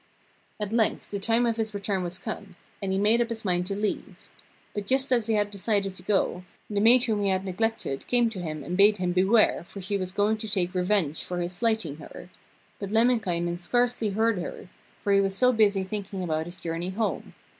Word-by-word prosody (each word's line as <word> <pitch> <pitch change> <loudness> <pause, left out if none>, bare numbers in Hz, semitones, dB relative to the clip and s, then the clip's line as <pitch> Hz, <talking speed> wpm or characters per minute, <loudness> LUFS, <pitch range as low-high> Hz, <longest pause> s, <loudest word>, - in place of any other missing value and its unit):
At 210 0 -3
length 230 -2 0
the 200 - -2
time 230 +4 +2
of 230 -1 0
his 220 -2 -2
return 200 -1 -1
was 175 0 -4
come, 200 -1 -6 0.3
and 195 -1 -2
he 190 - +1
made 215 +4 +3
up 235 - 0
his 225 -2 -5
mind 180 -1 0
to 195 - -2
leave. 210 +1 -3 0.6
But 205 -1 -4
just 265 +1 +2
as 235 -3 +3
he 225 - +2
had 205 -1 +1
decided 200 -1 0
to - - -8
go, 190 -3 0 0.3
the 205 - 0
maid 240 +3 +6
whom 220 -5 +1
he 200 - +1
had 190 0 0
neglected 195 -7 -2
came 240 -1 +3
to 200 - -6
him 155 -3 -5
and 175 - -4
bade 205 +2 +5
him 180 -1 -1
beware, 190 +2 +3
for 195 - -10
she 195 +2 -1
was 185 -1 -3
going 205 +3 +1
to 215 0 -4
take 185 -3 0
revenge 180 -4 +1
for 180 - -4
his 175 +1 -2
slighting 220 -7 0
her; 170 +3 -11 0.5
but 200 - -4
Lemminkainen 195 -7 +1
scarcely 240 +3 +1
heard 220 0 +1
her, 175 - -7 0.3
for 200 -1 +2
he 195 - +5
was 195 0 -1
so 250 +2 +4
busy 205 -4 +3
thinking 195 -1 -5
about 160 -1 -1
his 175 - -7
journey 170 +1 -4
home. 200 -2 -3
200 Hz, 220 wpm, -27 LUFS, 180-220 Hz, 0.6 s, maid